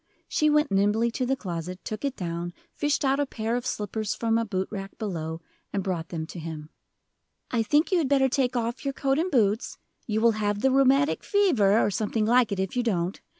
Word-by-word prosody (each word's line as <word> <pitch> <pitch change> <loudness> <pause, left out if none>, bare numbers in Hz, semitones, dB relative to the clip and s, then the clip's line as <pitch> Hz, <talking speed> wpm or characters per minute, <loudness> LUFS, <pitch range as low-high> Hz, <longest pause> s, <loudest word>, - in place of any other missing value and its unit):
She 305 - +2
went 300 0 +3
nimbly 205 +4 +2
to 250 +2 -2
the 270 - +2
closet, 180 -5 -5
took 215 +3 -5
it 275 -2 -1
down, 175 -1 -4 0.2
fished 290 -1 0
out 270 +1 +2
a 285 - +1
pair 225 -1 -2
of 245 +1 -2
slippers 210 -1 -2
from 225 0 +1
a 230 - -1
boot 190 -3 -2
rack 195 -2 -6
below, 165 -6 -4 0.3
and 200 -2 -1
brought 175 -4 -3
them 160 -2 -4
to 170 - -9
him. 155 -1 -7 0.8
"I 235 - +2
think 295 - +2
you 365 - +4
had 290 -5 0
better 270 -1 +4
take 255 -1 0
off 235 +1 -2
your 275 -1 -2
coat 275 +1 +1
and 350 +3 0
boots 225 - +1 0.3
you 215 -1 0
will 230 +1 +5
have 205 0 0
the 265 - +3
rheumatic 275 +2 +3
fever, 275 - +3
or 205 - +2
something 215 +2 0
like 240 0 +4
it, 200 - -2
if 190 +3 -2
you 250 - +2
don't. 185 -6 -1
225 Hz, 220 wpm, -26 LUFS, 195-265 Hz, 0.8 s, will